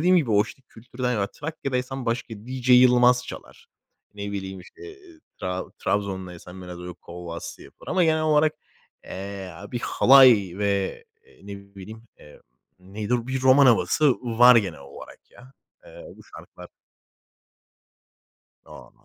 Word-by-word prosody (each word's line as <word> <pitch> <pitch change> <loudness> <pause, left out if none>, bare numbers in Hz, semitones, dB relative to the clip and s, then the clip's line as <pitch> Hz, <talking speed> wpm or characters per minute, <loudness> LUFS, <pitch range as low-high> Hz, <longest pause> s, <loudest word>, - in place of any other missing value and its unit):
dediğim 180 +3 +4
gibi, 140 -9 +1
o, 105 0 +4
işte, 135 - -13
kültürler, 125 +2 -5
yani, 100 -2 -1
Trakya'daysan 135 -4 -4
başka 115 0 -3
DJ 125 +4 -7
Yılmaz 125 0 +5
çalar. - - -11 0.5
Ne 100 0 -6
bileyim, 95 -1 -6
işte, 405 - -18 0.6
Tra 90 0 -3
Trabzon'daysan 95 -2 -4
biraz, 90 -1 -9
böyle, 90 0 -8
kolbastı 85 -1 -9
yapılır - - -16
ama 185 - +2
genel 160 -1 +1
olarak, 155 0 +2 0.5
eee, 95 0 -7
a 100 +5 -12
bir 120 - -3
halay 125 -11 +5
ve, 100 - -2 0.2
eee, - - -24
ne 100 0 -11
bileyim. 110 +4 -11
Emm, 75 - -17 0.4
nedir? 105 +6 -4
Bir 130 0 -3
roman 130 +1 +6
havası 140 +4 +3
var 120 +1 +5
genel 100 -9 -1
olarak, 70 0 -13
ya. 130 +1 -18 0.3
Eee, - - -13
bu - - -17
şarkılar - - -14 2.0
A, - - -14
115 Hz, 140 wpm, -24 LUFS, 95-130 Hz, 2.0 s, roman